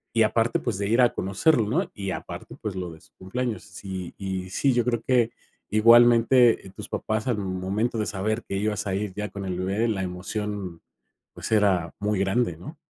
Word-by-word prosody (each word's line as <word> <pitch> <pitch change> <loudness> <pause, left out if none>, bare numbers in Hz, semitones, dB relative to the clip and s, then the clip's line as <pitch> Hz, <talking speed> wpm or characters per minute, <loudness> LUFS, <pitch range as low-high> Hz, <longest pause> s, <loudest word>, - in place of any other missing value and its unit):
y 115 - +4
aparte, 115 +2 +2
pues, - - -2
de 100 0 -1
ir 115 +4 +4
a 120 - +5
conocerlo, 105 - +2
¿no? 160 - 0
Y 100 -2 -3
aparte, - - -7
pues 105 -3 -4
lo 90 -2 -4
de 80 - -14
su - - -21
cumpleaños. 115 +5 -3
Sí 90 0 -7
y 95 -1 -4
sí, 135 +7 +2
yo 120 -1 +2
creo 120 -2 0
que 120 -1 +2 0.4
igualmente, 120 +2 +6
eh, - - -12
tus - - -8
papás 110 +1 -2
al 120 -4 +1
momento 95 +4 -2
de 110 - 0
saber 105 +3 -2
que 100 - -4
ibas 105 0 -1
a 95 - -1
ir 100 0 -2
ya 105 0 -3
con 100 +1 -7
el 90 -1 -3
bebé, 100 +5 0
la 100 -4 -1
emoción, 95 0 -4 0.5
pues, - - -6
era 95 -6 +3
muy 105 0 0
grande, 95 -1 +1
¿no? 150 - -10
105 Hz, 205 wpm, -25 LUFS, 95-115 Hz, 0.5 s, igualmente